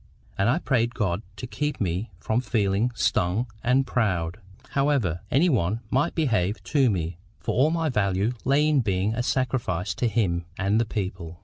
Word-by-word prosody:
And 100 +2 +2
I 130 - +3
prayed 120 -7 0
God 95 -4 0
to 125 - -6
keep 150 +4 -3
me 95 +3 -1
from 110 +6 0
feeling 110 -2 +1
STUNG 95 +3 +1 0.2
and 130 +2 +3
proud, 90 -9 0 0.3
however 135 - +1
any 150 +8 +4
one 110 - +1
might 145 +6 +1
behave 110 - 0
to 135 -5 +3
me; 85 -3 -2 0.2
for - - -2
all 135 +6 +4
my 165 0 0
value 100 -4 +1
lay 140 +3 +3
in 150 -2 +3
being 100 -2 0
a 120 - -1
sacrifice 115 -9 -1
to 120 - 0
Him 95 -7 0
and 100 +4 +2
the - - 0
people. 95 -5 -5
110 Hz, 175 wpm, -25 LUFS, 95-130 Hz, 0.3 s, any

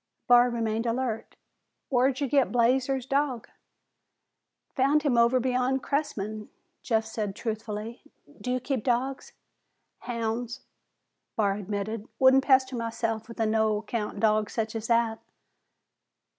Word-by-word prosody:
Barr 245 0 +6
remained 225 -1 -1
alert. 230 -1 -2 0.6
"Whar'd 260 +2 +2
ye 280 - +1
get 275 0 +2
Blazer's 255 +2 +2
dog?" 275 -3 -1 1.3
"Found 285 +3 +3
him 280 -5 +2
over 235 +2 +4
beyond 255 +1 0
Cressman," 215 -7 -3 0.3
Jeff 225 -2 0
said 215 -3 -4
truthfully. 220 0 -5 0.4
"Do 250 - -4
you 255 - +1
keep 255 -2 -2
dogs?" 260 +2 -1 0.7
"Houn's," 235 0 -3 0.7
Barr 205 -3 +2
admitted. 205 +2 -4
"Wouldn't 265 0 +6
pester 260 -1 +4
myself 225 -1 -3
with 230 - -11
a 225 - +2
no 220 -1 +2
account 210 -1 -4
dog 215 -1 +2
such 220 -1 -2
as 225 0 -4
that." 230 -1 +2
235 Hz, 125 wpm, -27 LUFS, 220-260 Hz, 1.3 s, Barr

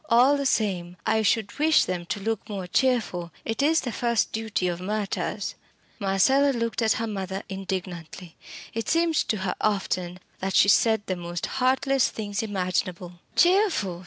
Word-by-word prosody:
All 250 +5 +5
the 280 -1 0
same, 180 -7 -1
I 220 0 +2
should 220 +1 0
wish 310 +1 +4
them 175 -2 -4
to 205 - -3
look 220 +1 -3
more 195 -3 -4
cheerful. 180 -5 0
It 225 +4 -2
is 315 +3 +3
the 245 - -4
first 235 0 0
duty 220 -4 -1
of 175 0 -3
martyrs." 205 +1 -2 0.5
Marcella 265 +9 +3
looked 230 0 -1
at 220 -1 +3
her 225 - -2
mother 195 -2 -4
indignantly. 185 -3 -6 0.4
It 225 -1 -3
seemed 330 0 +2
to 225 -7 +1
her 180 - 0
often 185 -3 -1 0.2
that 190 0 -2
she 200 - +6
said 220 0 +4
the 185 - -2
most 175 -1 -4
heartless 265 0 +2
things 205 -2 -4
imaginable. 180 -3 -3 0.2
"Cheerful!" 350 - +3
205 Hz, 160 wpm, -25 LUFS, 185-235 Hz, 0.5 s, she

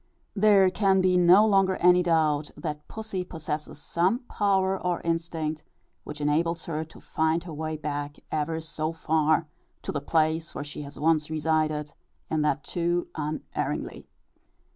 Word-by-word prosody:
There 200 -2 +5
can 195 0 +3
be 185 -1 +3
no 180 +4 +7
longer 195 -3 +3
any 180 0 +5
doubt, 155 -4 +2
that 150 -1 -5
pussy 215 -4 -4
possesses 155 -4 -5
some 185 - 0
power 195 -2 +1
or 180 -2 -1
instinct 165 -2 -2 0.4
which 150 0 -7
enables 165 +3 0
her 155 -1 -2
to 160 - -15
find 160 +1 0
her 170 -2 -8
way 155 +1 -3
back, 145 -1 -4 0.2
ever 155 +1 -1
so 160 0 -3
far, 160 -1 +1 0.4
to - - -3
the 145 - -3
place 160 +1 0
where 140 - -3
she 145 0 -7
has 145 0 -9
once 155 0 +2
resided, 155 -1 0 0.4
and 155 -1 +1
that 150 -1 0
too 175 0 -1
unerringly. 155 0 -4
160 Hz, 150 wpm, -27 LUFS, 150-180 Hz, 0.4 s, no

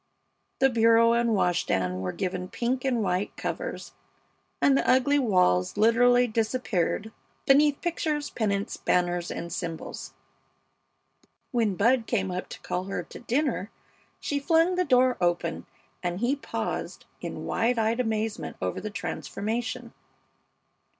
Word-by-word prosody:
The 270 - +4
bureau 230 0 +5
and 235 -1 +2
wash 180 -2 +2
stand 90 0 -1
were 90 -1 -2
given 180 - -3
pink 245 +6 -2
and 245 -5 +1
white 185 +1 -1
covers, - - -5 0.7
and 275 - +4
the - - +1
ugly 285 +3 +4
walls 180 - +2
literally 245 +3 +5
disappeared 220 -3 -1 0.3
beneath 285 +1 +4
pictures, 310 -4 -2
pennants, 200 -3 -1
banners, 175 -1 0
and 170 0 -5
symbols. 165 -3 -6 1.4
When 225 -5 +1
Bud 230 +4 +2
came 190 -5 0
up 180 0 -4
to - - -8
call 180 +1 -3
her 195 -2 -3
to - - -11
dinner 245 -4 -1 0.5
she 285 - -2
flung 330 +4 +3
the 365 0 +1
door 255 -2 +4
open, 175 -1 -1 0.3
and 175 0 -2
he 245 +5 +1
paused 285 - -4 0.2
in - - -6
wide 235 +2 +1
eyed 225 +2 +1
amazement 220 -2 -2
over 90 -1 -3
the 215 - -4
transformation. 230 +4 -4
225 Hz, 135 wpm, -27 LUFS, 185-250 Hz, 1.4 s, bureau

